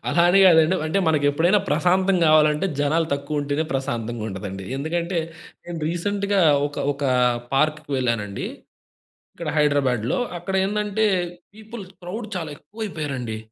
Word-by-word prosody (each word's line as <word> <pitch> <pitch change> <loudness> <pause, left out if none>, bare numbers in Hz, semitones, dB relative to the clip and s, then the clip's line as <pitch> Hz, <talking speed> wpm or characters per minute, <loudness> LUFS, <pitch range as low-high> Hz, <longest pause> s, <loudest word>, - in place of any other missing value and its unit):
అలా 170 - +3
అని 190 - +5
కాదండి. 160 +1 +5
అంటే 160 +5 0
మనకు 150 -2 +1
ఎప్పుడైనా 175 +7 +3
ప్రశాంతం 185 +5 +2
కావాలంటే, 155 +2 +4
జనాలు 160 +3 +1
తక్కువుంటేనే 145 +1 -2
ప్రశాంతంగా 120 -4 -3
ఉంటదండి. 95 0 -6
ఎందుకంటే 170 +5 -2 0.5
నేను 175 -1 -6
రీసెంట్‌గా 200 +3 0 0.3
ఒక 145 - -10 0.2
ఒక 140 +1 -10 0.5
పార్క్‌కి 155 +1 0
వెళ్ళానండి. 115 -6 -2 0.9
ఇక్కడ - - -4
హైదరాబాద్‌లో. 135 -6 +1 0.2
అక్కడ 190 +3 -4
ఏందంటే 210 +1 0 0.5
పీపుల్ 220 0 -9 0.2
క్రౌడ్ 215 +6 -6
చాలా 165 -4 -3
ఎక్కువ 215 +4 -18
అయిపోయారండి. 135 - -4
155 Hz, 125 wpm, -23 LUFS, 140-185 Hz, 0.9 s, అని